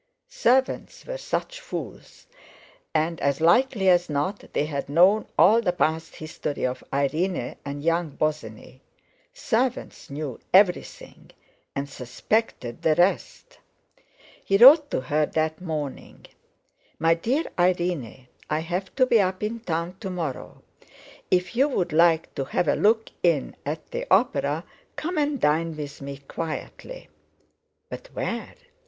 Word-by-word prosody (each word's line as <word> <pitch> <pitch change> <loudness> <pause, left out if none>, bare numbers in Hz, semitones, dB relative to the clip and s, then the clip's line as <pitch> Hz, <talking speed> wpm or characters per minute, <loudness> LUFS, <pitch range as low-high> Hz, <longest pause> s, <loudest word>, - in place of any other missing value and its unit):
Servants 260 +2 0
were - - -5
such - - -3
fools; - - -8 0.7
and, 160 +1 0
as 140 -1 +1
likely 195 +5 +3
as 175 -2 +4
not, 150 +8 -3
they 145 - 0
had 140 -2 -4
known 185 +8 +4
all 220 +5 +6
the 190 -6 +1
past 160 -2 -1
history 155 -2 -5
of 130 0 -3
Irene 140 +1 -1
and 145 0 -6
young 165 0 +1
Bosinney—servants 155 - -4
knew 140 -3 -5
everything, 185 -2 +1 0.5
and 140 +1 -2
suspected 130 - -2
the 155 - +3
rest. 195 - 0 0.8
He 195 - +2
wrote 285 +6 +8
to - - -1
her 150 +3 0
that 160 +1 -1
morning: 155 -6 -6 0.7
"MY 165 +1 +3
DEAR 245 - 0 0.2
IRENE,—I 170 -7 -1
have 180 +4 -4
to 260 - +4
be 235 -4 +4
up 185 +1 -2
in 225 +2 -2
town 170 -3 -3
to 195 - -5
morrow. 165 -8 -5 0.7
If 180 +5 +1
you 270 +4 +4
would 180 - -1
like 165 0 +3
to 135 - -3
have 165 - -1
a - - +4
look 220 +2 +2
in 165 -6 +1
at 155 +2 -5
the - - -4
opera, - - +2 0.3
come 330 +1 -2
and 290 -2 0
dine 155 +2 +1
with 145 -2 -7
me 140 0 -6
quietly 165 - -6 0.4
...." - - -50
But - - -8
where? - - -4
170 Hz, 135 wpm, -25 LUFS, 150-215 Hz, 0.8 s, wrote